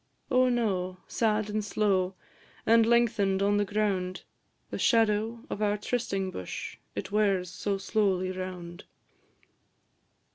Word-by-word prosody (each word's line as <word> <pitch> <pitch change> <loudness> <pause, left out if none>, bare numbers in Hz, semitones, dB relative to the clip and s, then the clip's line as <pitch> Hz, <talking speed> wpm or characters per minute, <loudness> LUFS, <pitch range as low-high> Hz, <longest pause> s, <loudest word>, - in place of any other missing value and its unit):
Oh, 255 0 +4
no! 190 -7 0
sad 215 -2 +1
and 210 0 -2
slow, 195 -3 +1 0.5
And 225 0 +5
lengthen'd 215 -5 +3
on 205 +1 +3
the 205 - +2
ground; 195 -3 -1 0.5
The - - -4
shadow 225 0 +2
of 210 - -5
our 210 0 +2
trysting 200 -4 -2
bush 90 - -6 0.2
It - - -4
wears 195 -4 +1
so 195 +2 -2
slowly 195 -2 +1
round. 185 -1 -7
205 Hz, 120 wpm, -29 LUFS, 185-220 Hz, 0.5 s, And